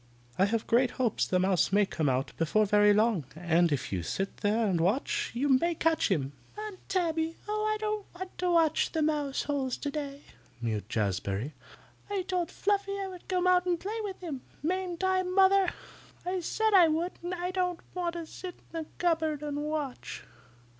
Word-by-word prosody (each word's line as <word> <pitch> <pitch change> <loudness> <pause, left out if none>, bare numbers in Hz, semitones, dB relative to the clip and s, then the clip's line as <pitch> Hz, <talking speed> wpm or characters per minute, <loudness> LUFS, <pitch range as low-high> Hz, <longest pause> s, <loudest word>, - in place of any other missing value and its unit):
I 190 - +6
have 220 +2 0
great 245 +2 +3
hopes 245 -5 +1
the 185 - +2
mouse 185 -1 +2
may 205 +1 +4
come 160 -6 0
out 130 +1 -1
before 190 +7 +2
so 200 - -9
very 210 0 +6
long, 210 -4 +3
and 170 0 +2
if 140 -7 -1
you 90 - 0
sit 195 - -3
there 215 +2 +1
and 180 -5 +1
watch, 280 - +1
you 270 +4 +1
may 310 +6 +3
catch 320 -3 +2
him." 140 -8 0 0.3
"Aunt 425 -3 -6
Tabby! 330 -3 0
Oh, 425 0 -1
I 430 - 0
don't 425 -1 -2
want 370 +1 -7
to 360 0 +1
watch 330 -3 +3
mouse 300 -3 +1
holes 275 -3 -1
today," 285 -1 -4 0.4
mewed 110 -3 -3
Jazbury. 100 +5 -1 0.6
"I 400 -2 -1
told 360 -2 -1
Fluffy 400 0 0
I 390 -1 -3
would 365 -2 -11
come 365 -1 +1
out 365 0 +4
and 350 -2 +1
play 430 +5 -4
with 395 -3 -5
him. 300 -8 -5 0.2
Mayn't 365 +1 -1
I, 375 0 +3
Mother? 380 0 +4 0.6
I 365 +1 -1
said 440 +5 0
I 360 -4 +8
would, 325 +3 0
and 350 +1 -3
I 360 +1 -2
don't 360 -2 -1
want 350 -2 -1
to 340 -1 -5
sit 360 +2 -8 0.2
there 330 - -3
in 310 - -8
the - - -27
cupboard 320 -4 +1
and 290 -1 -3
watch. 295 -3 -4
320 Hz, 195 wpm, -30 LUFS, -, 0.6 s, I